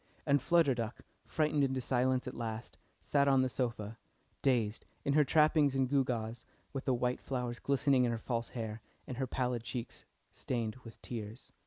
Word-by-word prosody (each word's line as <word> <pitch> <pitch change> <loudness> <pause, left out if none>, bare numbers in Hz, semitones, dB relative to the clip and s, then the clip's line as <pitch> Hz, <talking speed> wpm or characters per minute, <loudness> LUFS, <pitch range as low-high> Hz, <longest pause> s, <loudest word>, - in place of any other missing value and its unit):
And 140 -2 +3
Flutter 165 -2 +4
Duck, 115 0 -4 0.3
frightened 150 -2 +2
into 130 -1 +1
silence 130 +1 +1
at 130 - -4
last, 115 0 -5 0.3
sat 140 -1 +2
on 135 -1 +5
the 130 - +1
sofa, 115 -4 -3 0.4
dazed, 115 -5 +1 0.2
in 140 - +2
her 150 +1 +6
trappings 150 -1 +4
and 135 -1 +2
gewgaws, 120 -4 0 0.3
with 135 - -4
the 130 - +3
white 125 +1 0
flowers 125 -2 -3
glistening 140 -1 +3
in 120 - +2
her 115 - -1
false 115 0 -2
hair, 110 -1 -4 0.2
and 125 - -6
her 130 0 -1
pallid 125 -1 -1
cheeks 120 0 -6 0.3
stained 115 -3 -2
with 115 -3 -13
tears. 110 0 -6
125 Hz, 175 wpm, -33 LUFS, 115-135 Hz, 0.4 s, her